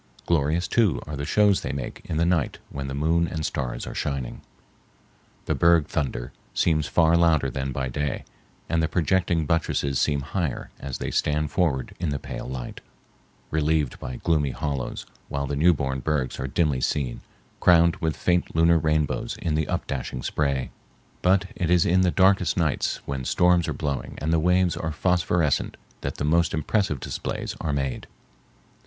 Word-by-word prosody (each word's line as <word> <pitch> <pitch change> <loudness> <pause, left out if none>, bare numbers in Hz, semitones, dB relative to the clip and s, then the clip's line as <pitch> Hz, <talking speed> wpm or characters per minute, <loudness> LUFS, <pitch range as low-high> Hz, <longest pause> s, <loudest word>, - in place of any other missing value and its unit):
Glorious, 80 +1 +1
too, 110 -7 +2
are 75 - -5
the 70 0 -4
shows 105 -2 +4
they - - -3
make 70 -3 -5
in 80 - -3
the 85 - +3
night 85 -4 +1
when 70 -1 -4
the 70 - -4
moon 80 +4 +2
and 80 -2 -3
stars - - -3
are - - -6
shining. 70 -4 -3 1.0
The - - 0
berg 85 -2 +4
thunder 65 -6 -3 0.2
seems 75 -3 +2
far 80 -1 +4
louder 80 -6 +3
than 65 +1 -3
by 65 0 -2
day, 75 +3 -3 0.4
and 85 +1 +1
the 80 - +2
projecting 85 -1 +1
buttresses 70 -4 0
seem 70 -2 +1
higher 75 0 -3
as 70 -2 -5
they - - -4
stand 75 0 0
forward 75 -8 0
in 85 - -1
the 70 - -1
pale - - -7
light, 65 -2 -6 0.7
relieved 75 -3 +1
by 65 - -6
gloomy 75 0 +1
hollows, 70 -2 -3 0.2
while 70 0 -2
the 70 - -2
new 80 +5 +5
born 65 -4 -1
bergs 65 -2 -1
are 65 - -2
dimly 70 -1 +1
seen, 65 -5 -1 0.4
crowned 85 +1 +5
with 80 -4 -2
faint 90 -2 0
lunar 85 +1 +5
rainbows 80 +9 0
in 85 -4 -1
the 75 0 0
up - - -2
dashing 65 -2 -4
spray. 70 -3 -1 0.5
But 95 +1 +3
it 85 - -1
is 90 -1 +4
in 95 +2 +3
the 90 - +3
darkest 95 0 +3
nights 80 -5 0
when 70 -2 -3
storms 90 +4 +3
are - - -1
blowing 70 -5 -3
and 75 +3 -1
the 80 - +4
waves 90 +1 +3
are 80 - -3
phosphorescent 85 -2 +1 0.2
that - - -3
the 70 - -2
most 85 +2 +2
impressive 80 -1 0
displays - - -4
are 80 - -1
made. 70 -2 -2
75 Hz, 175 wpm, -25 LUFS, 70-85 Hz, 1.0 s, new